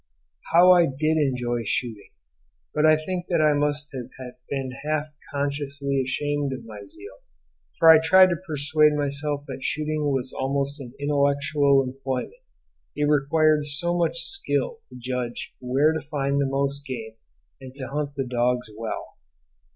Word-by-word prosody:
How 175 +2 +7
I 175 -2 +6
did 155 +4 0
enjoy 125 -4 0
shooting! 110 -1 -3 0.6
But 150 +1 +3
I 155 0 +6
think 175 +3 -4
that 170 -3 +2
I 155 -1 +4
must 145 0 -1
have 125 -2 -6 0.4
been 135 -2 -3
half 155 0 -1 0.2
consciously 140 -1 -2
ashamed 145 +1 -2
of 130 -3 -8
my 105 -2 -9
zeal, 100 -1 -13 0.6
for 165 - +4
I 160 - +8
tried 185 +3 +6
to 170 - -2
persuade 150 0 +2
myself 145 0 -2
that 130 -1 -7
shooting 155 0 -1
was 130 -1 -2
almost 140 +2 -2
an 125 -1 -10
intellectual 140 -1 +2
employment; 130 0 -4 0.6
it 150 0 +1
required 150 +1 +3
so 170 +4 0
much 170 -1 0
skill 450 +4 -2
to - - -13
judge 125 -1 -4
where 135 +5 +2
to 160 - -3
find 140 -1 -1
most 140 +1 -1
game 115 -4 -6 0.5
and 130 0 -11
to 135 -2 -6
hunt 145 0 -3
the 135 -1 -2
dogs 125 -1 0
well. 115 0 -6
140 Hz, 150 wpm, -24 LUFS, 130-150 Hz, 0.6 s, I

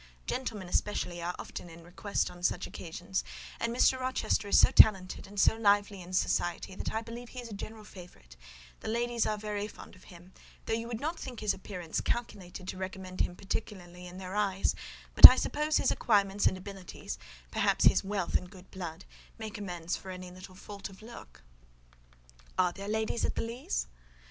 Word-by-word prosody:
Gentlemen 215 -7 -3
especially 175 -2 -1
are 175 +1 -3
often 175 - -8
in 165 0 -13
request 180 +4 -2
on 175 0 -13
such 180 +1 0
occasions; 175 +2 -4 0.4
and 230 - -1
Mr. 255 +2 +3
Rochester 255 -4 0
is - - +5
so - - +6
talented 190 -4 +5
and 200 +1 -6
so 220 - +5
lively 205 -2 +2
in 175 +1 -10
society, 180 0 0
that - - -4
I 220 +1 -2
believe 235 +1 -9
he 255 - -8
is 240 -1 -7
a - - -8
general 215 +2 -8
favourite: 175 - -14 0.4
the - - -8
ladies 235 +1 0
are 215 - -1
very 210 -1 -3
fond 210 - -13
of 185 - -18
him; 180 +1 -15 0.3
though - - -1
you 230 +1 -2
would 235 -2 -4
not 320 +5 -3
think 250 -3 -7
his 210 -2 +1
appearance 180 -4 -5
calculated 195 -6 -4
to - - -5
recommend 185 0 -5
him 180 - -1
particularly 180 -3 -6
in 180 +1 -10
their 190 +1 -6
eyes: 195 -2 +1 0.4
but - - +15
I - - +2
suppose 300 +1 0
his 270 - +2
acquirements 200 -2 +2
and 185 - 0
abilities, 190 -1 -8 0.3
perhaps - - +2
his - - +5
wealth 195 -2 -2
and 180 - 0
good 185 -1 -15
blood, 175 -2 -7 0.3
make 220 -1 -6
amends 175 -3 -3
for 190 - -11
any 185 -1 -7
little 185 +1 -12
fault 200 +1 -8
of 195 +2 -15
look." 220 - -12 1.1
"Are 180 -1 +3
there 200 +2 -8
ladies 220 +2 -1
at - - 0
the - - -1
Leas?" 230 - -3
195 Hz, 190 wpm, -30 LUFS, 180-220 Hz, 1.1 s, but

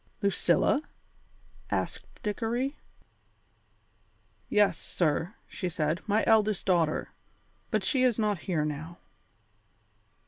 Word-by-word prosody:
"Lucilla?" 200 - +3 0.9
asked - - -4
Dickory. 235 +6 -1 1.7
"Yes, 210 -1 +4
sir," 170 +4 -1
she 180 - -3
said, 155 0 -1
"my 215 +1 +3
eldest 215 -3 +3
daughter. 170 -5 +2 0.6
But 215 -4 0
she 265 +5 +2
is 250 -4 +3
not 210 -4 +1
here 155 -4 +1
now." 155 +3 -5
200 Hz, 95 wpm, -29 LUFS, 170-220 Hz, 1.7 s, Yes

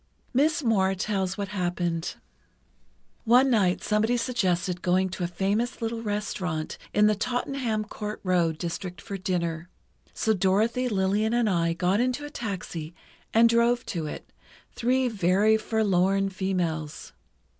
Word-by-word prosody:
Miss 305 +5 +2
Moir 195 -5 +2
tells 190 -1 -1
what 200 -2 -3
happened: 175 -3 -2 1.1
One 250 +3 +5
night 190 -6 +2
somebody 220 +3 +2
suggested 185 -7 0
going 185 +1 +2
to 180 0 -5
a - - +1
famous 200 +7 -1
little 230 -1 -3
restaurant 195 -7 -3
in 210 - +4
the 215 - +5
Tottenham 245 0 -1
Court 210 0 -6
Rd. 170 -3 +2
district 175 +1 -5
for 200 - -6
dinner. 175 -3 -2 0.4
So 220 - +1
Dorothy, 215 +6 +1
Lillian 205 +2 +1
and 240 -2 +2
I 170 -4 +1
got 180 +4 +1
into 255 +4 0
a 290 - -8
taxi 180 - -5 0.4
and 230 +1 +6
drove 235 +1 +2
to 165 -4 -3
it, - - -8 0.4
three 255 +2 +1
very 205 0 +3
forlorn 195 -3 +1
females.... 175 -5 -3
200 Hz, 135 wpm, -26 LUFS, 180-230 Hz, 1.1 s, and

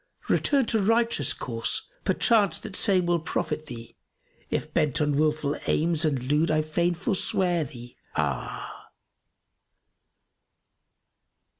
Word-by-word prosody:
Return 275 -4 +3
to 220 -2 +1
righteous 230 +3 +2
course; - - -2
perchance 205 -8 +3
that 215 -3 -7
same 190 -4 +3
will 175 0 +2
profit 155 -1 -3
thee; 115 -2 -9 0.3
* - - -36
If 155 0 -3
bent 150 -5 +1
on 150 -2 +1
wilful 150 -1 +1
aims 165 0 +1
and 140 -5 0
lewd 150 +5 +1
I 155 0 +2
fain 170 +3 0
forswear 180 -3 +1
thee, 120 -2 -11 0.2
ah!" - - -3
160 Hz, 120 wpm, -26 LUFS, 150-190 Hz, 0.3 s, Return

